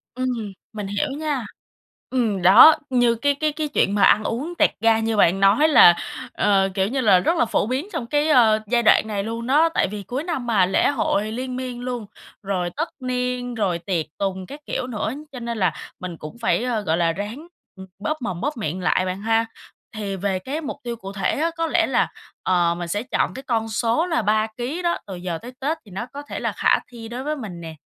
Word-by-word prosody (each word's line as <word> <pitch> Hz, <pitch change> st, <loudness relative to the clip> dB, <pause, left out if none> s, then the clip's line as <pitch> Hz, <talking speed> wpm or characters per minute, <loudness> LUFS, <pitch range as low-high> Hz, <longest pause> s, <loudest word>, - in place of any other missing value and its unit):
Ừm, 255 Hz, 0 st, -1 dB, 0.4 s
mình 210 Hz, -2 st, -5 dB
hiểu 200 Hz, 0 st, -1 dB
nha. 295 Hz, -6 st, -2 dB, 0.6 s
Ừm, 225 Hz, -7 st, 0 dB
đó, 200 Hz, -, +9 dB
như 245 Hz, -2 st, +3 dB
cái 285 Hz, +5 st, +1 dB
cái 305 Hz, +1 st, 0 dB
cái 300 Hz, 0 st, -3 dB
chuyện 205 Hz, -8 st, +1 dB
mà 200 Hz, -, +3 dB
ăn 215 Hz, -, +5 dB
uống 280 Hz, +10 st, -3 dB
tẹt -, -, +4 dB
ga 225 Hz, 0 st, +4 dB
như 225 Hz, -1 st, -1 dB
bạn 190 Hz, 0 st, +4 dB
nói 200 Hz, +11 st, +5 dB
là, 175 Hz, -, +8 dB, 0.4 s
ờ, 195 Hz, -2 st, +2 dB
kiểu 190 Hz, 0 st, +1 dB
như 265 Hz, +3 st, -1 dB
là, 200 Hz, -6 st, +5 dB
rất 330 Hz, -, +1 dB
là -, -, +3 dB
phổ 220 Hz, -, 0 dB
biến 265 Hz, +9 st, -2 dB
trong 235 Hz, -, -3 dB
cái, 295 Hz, +4 st, +1 dB
ơ, 225 Hz, -6 st, +5 dB
giai 235 Hz, +1 st, +2 dB
đoạn 220 Hz, -, +5 dB
này 205 Hz, -2 st, -2 dB
luôn 230 Hz, +2 st, -4 dB
đó, 305 Hz, +5 st, +4 dB
tại -, -, +2 dB
vì 205 Hz, +1 st, -6 dB
cuối 255 Hz, -, -4 dB
năm 325 Hz, -8 st, -3 dB
mà, 205 Hz, -6 st, +4 dB
lễ 185 Hz, -, +2 dB
hội 215 Hz, -6 st, 0 dB
liên 255 Hz, +2 st, -4 dB
miên 255 Hz, -1 st, -5 dB
luôn, 245 Hz, -3 st, -4 dB, 0.4 s
rồi 185 Hz, -3 st, -1 dB
tất 325 Hz, +3 st, -1 dB
niên, 250 Hz, -1 st, -2 dB
rồi 185 Hz, -6 st, 0 dB
tiệc 170 Hz, -2 st, -2 dB
tùng 190 Hz, -1 st, -2 dB
các 285 Hz, +9 st, -10 dB
kiểu 250 Hz, -, -3 dB
nữa, 220 Hz, -1 st, -3 dB, 0.2 s
cho 255 Hz, -, -7 dB
nên 235 Hz, -1 st, -4 dB
là 185 Hz, -5 st, +1 dB, 0.3 s
mình 180 Hz, -3 st, -6 dB
cũng 155 Hz, +10 st, -9 dB
phải, 230 Hz, -, +1 dB
ơ, 240 Hz, -4 st, -1 dB
gọi 165 Hz, -4 st, 0 dB
là, 170 Hz, -1 st, +2 dB
ráng, 215 Hz, -, -6 dB, 0.3 s
ừm, 190 Hz, 0 st, -10 dB, 0.2 s
bóp 310 Hz, 0 st, -1 dB
mồm, 190 Hz, -8 st, -4 dB
bóp 290 Hz, 0 st, -2 dB
miệng 185 Hz, -4 st, -3 dB
lại 185 Hz, +1 st, +2 dB
bạn 185 Hz, +1 st, -4 dB
ha. 225 Hz, +1 st, +2 dB, 0.5 s
Thì 200 Hz, -2 st, -3 dB
về 190 Hz, 0 st, -1 dB
cái 280 Hz, -, -4 dB
mục 290 Hz, -1 st, -5 dB
tiêu 240 Hz, -1 st, -4 dB
cụ 195 Hz, -4 st, -8 dB
thể 195 Hz, -2 st, 0 dB
á, 330 Hz, +2 st, +1 dB
có 330 Hz, 0 st, 0 dB
lẽ -, -, +2 dB
là, -, -, +2 dB, 0.4 s
ờ, 175 Hz, -2 st, +2 dB
mình 175 Hz, -1 st, -4 dB
sẽ 205 Hz, +5 st, -2 dB
chọn 255 Hz, -, -1 dB
cái 265 Hz, -, -8 dB
con 225 Hz, -4 st, -1 dB
số 230 Hz, +8 st, +1 dB
là 330 Hz, -2 st, 0 dB
3 215 Hz, +1 st, +2 dB
ký 265 Hz, +9 st, -3 dB
đó, 345 Hz, -1 st, +1 dB
từ 195 Hz, -, -6 dB
giờ 175 Hz, -2 st, -4 dB
tới 245 Hz, -, -9 dB
Tết 300 Hz, +5 st, -1 dB
thì 200 Hz, -, -15 dB
nó 195 Hz, +6 st, -4 dB
có 285 Hz, -, -6 dB
thể -, -, -5 dB
là -, -, -1 dB
khả -, -, +2 dB
thi 230 Hz, -2 st, -9 dB
đối 245 Hz, +3 st, -6 dB
với 305 Hz, +1 st, -2 dB
mình 195 Hz, -10 st, -7 dB
nè, 160 Hz, -1 st, -8 dB
225 Hz, 235 wpm, -22 LUFS, 195-260 Hz, 0.6 s, đó